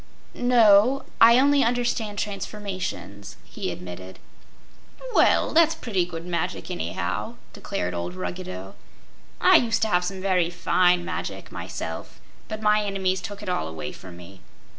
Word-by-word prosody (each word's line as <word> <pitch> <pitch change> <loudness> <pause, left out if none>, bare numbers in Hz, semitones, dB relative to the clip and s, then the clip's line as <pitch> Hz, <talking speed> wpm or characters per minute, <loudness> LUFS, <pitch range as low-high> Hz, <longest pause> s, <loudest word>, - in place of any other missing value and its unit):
"No; 245 +1 +5 0.2
I 235 +1 +8
only 280 +1 +4
understand 230 -3 -1
transformations," 185 - -5
he - - -5
admitted. 90 +1 -8 1.0
"Well, - - +4
that's 325 0 +5
pretty 200 - -1
good 165 -1 -7
magic, 170 - -3
anyhow," 85 +2 -3 0.2
declared 90 0 -4
old 85 +1 -4
Ruggedo. 90 +1 -6 0.7
"I - - +7
used 225 -2 +1
to 220 - +1
have 180 -2 +2
some 190 +1 -4
very 185 -3 +1
fine 180 0 +2
magic, - - -5
myself, - - -6 0.3
but 215 0 -6
my 210 0 +3
enemies 190 -2 -1
took 205 +1 -7
it - - -8
all 80 - -1
away 80 -2 -6
from 90 -2 -12
me. 90 +2 -13
185 Hz, 140 wpm, -24 LUFS, -, 1.0 s, I